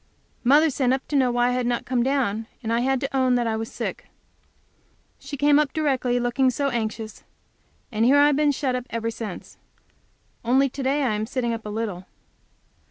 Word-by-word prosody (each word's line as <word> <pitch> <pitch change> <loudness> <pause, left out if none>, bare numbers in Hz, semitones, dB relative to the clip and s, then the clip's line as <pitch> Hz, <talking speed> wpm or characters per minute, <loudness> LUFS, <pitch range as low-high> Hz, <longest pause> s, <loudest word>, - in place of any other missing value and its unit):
Mother 295 +5 +5
sent 255 -1 +1
up 265 - -3
to 295 - -2
know 260 -2 +4
why 245 0 +2
I 250 - 0
did 250 -1 -1
not 240 -1 -1
come 250 -1 0
down, 235 -5 0 0.2
and 225 0 -1
I 230 - +2
had 265 +1 +1
to 275 0 -3
own 260 -1 +3
that 240 -1 +1
I 225 -1 0
was 225 0 -4
sick. - - -5 1.1
She 285 - -7
came 290 +1 +4
up 300 -3 0
directly 260 -5 0
looking 245 +2 +2
so 275 +3 -1
anxious! 220 -2 -4 0.7
And 220 -1 0
here 265 +4 +5
I 285 - +6
have 295 -1 +3
been 295 0 +3
shut 265 -2 -1
up 250 0 -4
ever 230 0 -2
since; 220 -5 -8 0.8
only 265 +4 +3
to 275 - -7
day 275 +2 +1
I 245 -5 +1
am 210 +1 -2
sitting 245 -2 -1
up 225 -2 -6
a - - -4
little. 205 -4 -4
250 Hz, 210 wpm, -24 LUFS, 230-275 Hz, 1.1 s, I